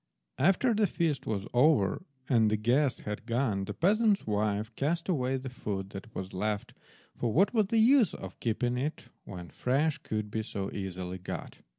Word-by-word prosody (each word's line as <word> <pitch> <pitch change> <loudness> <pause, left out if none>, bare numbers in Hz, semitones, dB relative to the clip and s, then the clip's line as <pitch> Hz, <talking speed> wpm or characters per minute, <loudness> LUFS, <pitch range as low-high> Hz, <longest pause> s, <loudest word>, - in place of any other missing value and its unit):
After 195 - +4
the 215 -1 +3
feast 165 -7 -1
was 100 -2 -1
over 125 -5 +4 0.3
and 115 -5 +4
the 110 - +1
guests 125 +6 +2
had 105 +2 -6
gone, 115 -5 0
the - - -6
peasant's 210 +3 +3
wife 105 +1 -1
cast 165 +4 -1
away 135 -7 +1
the 130 0 -6
food 100 -6 -4
that 105 +3 -9
was 95 0 -5
left, 105 +2 -2 0.4
for 120 - -1
what 195 - +3
was 215 -4 +3
the 230 - +1
use 230 - +5
of 95 0 -9
keeping 120 +2 0
it 150 +4 -4 0.2
when 90 -3 -8
fresh 140 +4 +1
could 105 -1 -4
be 110 - -1
so 100 -2 -4
easily 95 -2 -5
got? 90 - -7
120 Hz, 180 wpm, -30 LUFS, 105-155 Hz, 0.4 s, use